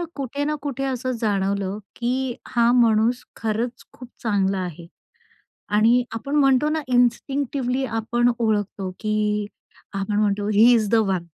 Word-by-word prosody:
कुठे 280 +1 -3
ना 300 +1 0
कुठे 275 -2 -4
असं 255 -1 -2
जाणवलं 200 -1 0 0.2
की 250 +1 -1
हा 235 -1 +3
माणूस 235 0 +3
खरंच 230 +3 -3
खूप 250 - -11 0.2
चांगला 200 -3 +1
आहे 175 -2 -6 0.9
आणि 235 +4 +4
आपण 275 +6 -4
म्हणतो 275 0 +4
ना, 315 0 -1
इन्स्टिंक्टिव्हली 255 +1 0
आपण 240 +1 +1
ओळखतो 205 -4 -1
की 210 -1 0 0.5
आपण 195 +1 -1
म्हणतो, 205 -1 0
ही 215 +3 +6
इज 220 -3 +2
द 230 - +3
वन. 195 -6 +1
230 Hz, 135 wpm, -23 LUFS, 210-255 Hz, 0.9 s, ही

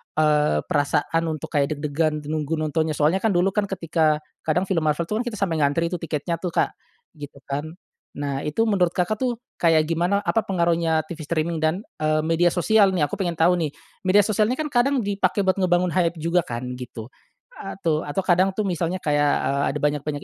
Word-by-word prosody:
eee, 150 -1 +3
perasaan 150 +1 0
untuk 160 0 -5
kayak 145 +1 +1
deg-degan 150 +1 -1
nunggu 155 +1 -2
nontonnya 155 0 -1
soalnya, 155 +6 +2
kan, 205 -3 +1
dulu, 180 +2 +3
kan, 205 +1 0
ketika 160 -5 0 0.2
kadang 175 +4 +2
film 185 -4 -1
Marvel, 150 +3 +1
tuh, 210 +6 -2
kita 240 -3 -4
sampai 165 -5 0
ngantri, 160 +4 +1
tuh, 180 - -3
tiketnya, 165 +1 -3
tuh, 180 - -3
Kak, - - +2 0.5
gitu, 145 -1 -9
kan. 140 +3 -4 0.5
Nah, 140 -1 -3
itu 150 +10 0
menurut 185 -5 +2
Kakak, 190 +4 0
tuh, 245 -3 -1 0.2
kayak 165 -2 +4
gimana, 175 +5 +1
apa 225 - +1
pengaruhnya 170 -3 +1
TV 170 0 -8
streaming 165 0 -1
dan, 160 +6 0 0.2
eee, 155 0 +1
media 165 +2 +2
sosial, 195 +2 +3
nih, 150 -5 +2
aku - - -6
pengen 175 -3 -1
tahu, 175 +2 +3
nih. 155 -3 -1 0.4
Media 205 +2 +6
sosialnya, 215 +3 +1
kan, 300 +1 -4
kadang 260 0 +2
dipakai 200 -1 0
buat 190 +1 +1
ngebangun 180 -1 +2
hype 170 -1 +1
juga, 170 +2 +1
kan, 120 +1 -4 0.2
gitu, 120 -1 -8 0.5
atu 170 -5 -2
atau 145 +6 -2
kadang, 185 +2 +4
tuh, 215 - -1
misalnya 175 0 -1
kayak, 145 -2 +2
eee, 140 +1 0
ada 150 - -4
banyak-banyak 145 0 -1
165 Hz, 195 wpm, -23 LUFS, 150-185 Hz, 0.5 s, Media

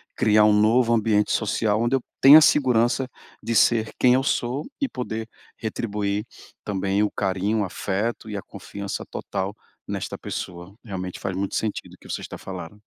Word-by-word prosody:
criar 105 0 +4
um 105 - +5
novo 115 +3 +4
ambiente 105 -2 +2
social 105 0 +1
onde 120 +3 +2
eu 135 - 0 0.2
tenha 145 +3 +10
segurança 130 -3 +3 0.3
de 115 - -2
ser 110 -1 +3
quem 125 -1 +5
eu 130 - +1
sou 130 +1 -1 0.2
e 275 - +1
poder 115 -3 -5 0.3
retribuir 105 -2 -3 0.4
também 100 0 0
o 105 - 0
carinho, 100 +2 0
o - - +1
afeto 105 +5 -3
e - - -4
a 100 - -3
confiança 100 +1 -7
total 100 +1 -4 0.3
nesta - - -4
pessoa. 90 +1 -6
Realmente 95 -5 -6
faz 95 -1 -3
muito 100 0 -2
sentido 110 -2 -3
o - - -15
que - - -16
você - - -3
está - - -8
falando. 95 +2 -8
105 Hz, 170 wpm, -24 LUFS, 100-115 Hz, 0.4 s, tenha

